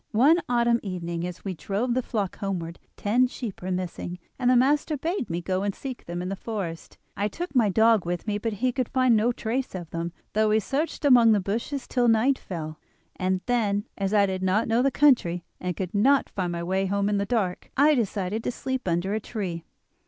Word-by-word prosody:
One 285 Hz, +10 st, +5 dB
autumn 235 Hz, -1 st, +3 dB
evening 170 Hz, -3 st, -4 dB
as 180 Hz, +2 st, -9 dB
we 195 Hz, -, -2 dB
drove 205 Hz, +8 st, -2 dB
the 255 Hz, -, +1 dB
flock 210 Hz, -6 st, -3 dB
homeward 175 Hz, -4 st, -3 dB, 0.2 s
ten 240 Hz, +5 st, +3 dB
sheep 240 Hz, -5 st, -7 dB
were 185 Hz, -, -4 dB
missing, 180 Hz, -1 st, -3 dB, 0.2 s
and 250 Hz, -1 st, +2 dB
the 255 Hz, -, +5 dB
master 290 Hz, +4 st, +2 dB
bade 330 Hz, -, -2 dB
me 170 Hz, +1 st, -2 dB
go 185 Hz, +1 st, -1 dB
and 200 Hz, -1 st, -1 dB
seek 260 Hz, -3 st, -7 dB
them 175 Hz, +1 st, -4 dB
in 180 Hz, -, -3 dB
the 195 Hz, -, -2 dB
forest. 190 Hz, -6 st, -5 dB, 0.2 s
I 205 Hz, -, 0 dB
took 345 Hz, -, -6 dB
my 235 Hz, -6 st, +4 dB
dog 220 Hz, 0 st, +4 dB
with 175 Hz, +1 st, -3 dB
me, 210 Hz, -1 st, -1 dB
but 225 Hz, +1 st, -2 dB
he 250 Hz, +5 st, 0 dB
could 255 Hz, -1 st, -2 dB
find 255 Hz, -3 st, +3 dB
no 220 Hz, +3 st, +3 dB
trace 240 Hz, 0 st, -3 dB
of 175 Hz, -3 st, -7 dB
them, 170 Hz, +1 st, -3 dB, 0.2 s
though 215 Hz, +1 st, +3 dB
we 215 Hz, +1 st, +4 dB
searched 290 Hz, +7 st, -2 dB
among 240 Hz, -5 st, +7 dB
the 210 Hz, -, +3 dB
bushes 230 Hz, +8 st, -3 dB
till 245 Hz, -1 st, +1 dB
night 235 Hz, +4 st, +3 dB
fell; 155 Hz, -4 st, -6 dB, 0.4 s
and 185 Hz, 0 st, 0 dB
then, 210 Hz, -4 st, +1 dB
as 195 Hz, -1 st, -2 dB
I 205 Hz, -1 st, +5 dB
did 190 Hz, -1 st, -3 dB
not 190 Hz, +4 st, +1 dB
know 230 Hz, +2 st, +2 dB
the 275 Hz, -, +3 dB
country 240 Hz, -, +3 dB, 0.2 s
and 180 Hz, -1 st, -3 dB
could 185 Hz, -2 st, -4 dB
not 265 Hz, +7 st, +3 dB
find 180 Hz, -3 st, -2 dB
my 170 Hz, 0 st, -3 dB
way 190 Hz, +2 st, 0 dB
home 200 Hz, +1 st, 0 dB
in 205 Hz, -1 st, +1 dB
the 200 Hz, -, 0 dB
dark, 195 Hz, -6 st, -1 dB
I 295 Hz, +3 st, +6 dB
decided 215 Hz, -3 st, -1 dB
to -, -, 0 dB
sleep 260 Hz, -2 st, -4 dB
under 175 Hz, +3 st, 0 dB
a 215 Hz, -, 0 dB
tree. 185 Hz, -7 st, -5 dB
210 Hz, 220 wpm, -26 LUFS, 185-245 Hz, 0.4 s, among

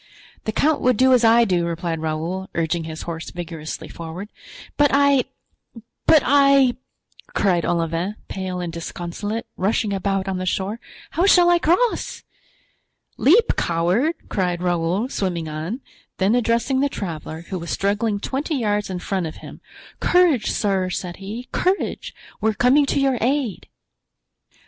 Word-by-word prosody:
"The 220 Hz, -, 0 dB
count 300 Hz, +7 st, +1 dB
would 250 Hz, -3 st, +3 dB
do 260 Hz, +2 st, +5 dB
as 245 Hz, -2 st, +4 dB
I 230 Hz, +1 st, +6 dB
do," 180 Hz, -4 st, +1 dB
replied 170 Hz, -1 st, -3 dB
Raoul, 160 Hz, +4 st, -3 dB
urging 165 Hz, 0 st, -1 dB
his 160 Hz, -1 st, -6 dB
horse 165 Hz, -1 st, -5 dB
vigorously 165 Hz, -3 st, -6 dB
forward. 170 Hz, +5 st, -8 dB, 0.5 s
"But 290 Hz, 0 st, +4 dB
I—but 280 Hz, 0 st, +1 dB
I," 275 Hz, -2 st, +5 dB, 0.6 s
cried 180 Hz, -4 st, +2 dB
Olivain, 170 Hz, +4 st, -1 dB
pale 185 Hz, -1 st, -4 dB
and 175 Hz, -2 st, -4 dB
disconsolate 175 Hz, +6 st, -5 dB
rushing 205 Hz, +1 st, 0 dB
about 195 Hz, 0 st, -1 dB
on 190 Hz, -1 st, -2 dB
the 185 Hz, -, -3 dB
shore, 195 Hz, +5 st, -2 dB, 0.3 s
"how 355 Hz, +4 st, +2 dB
shall 350 Hz, -2 st, +6 dB
I 345 Hz, -, +4 dB
cross?" 365 Hz, +9 st, +1 dB, 0.9 s
"Leap, 410 Hz, -, +4 dB
coward!" 180 Hz, -, +1 dB
cried 180 Hz, -2 st, -1 dB
Raoul, 175 Hz, +5 st, 0 dB
swimming 180 Hz, -, -2 dB
on; 160 Hz, -, -4 dB, 0.4 s
then 195 Hz, +3 st, +2 dB
addressing 240 Hz, +2 st, +1 dB
the 285 Hz, +1 st, +2 dB
traveler, 160 Hz, -, -6 dB
who 185 Hz, -, -3 dB
was 170 Hz, -, -7 dB
struggling 205 Hz, +1 st, 0 dB
twenty 275 Hz, +8 st, -2 dB
yards 210 Hz, -5 st, 0 dB
in 185 Hz, -, -3 dB
front 180 Hz, -1 st, -2 dB
of 155 Hz, -, -8 dB
him: -, -, -11 dB, 0.4 s
"Courage, 345 Hz, -11 st, +3 dB
sir!" 195 Hz, -3 st, 0 dB
said 180 Hz, -1 st, -4 dB
he, 215 Hz, +6 st, -7 dB
"courage! 375 Hz, +2 st, -1 dB, 0.3 s
we 220 Hz, -, +3 dB
are -, -, 0 dB
coming 275 Hz, +5 st, +4 dB
to -, -, +1 dB
your 270 Hz, -3 st, +1 dB
aid." 255 Hz, -5 st, -1 dB
200 Hz, 150 wpm, -22 LUFS, 175-260 Hz, 0.9 s, I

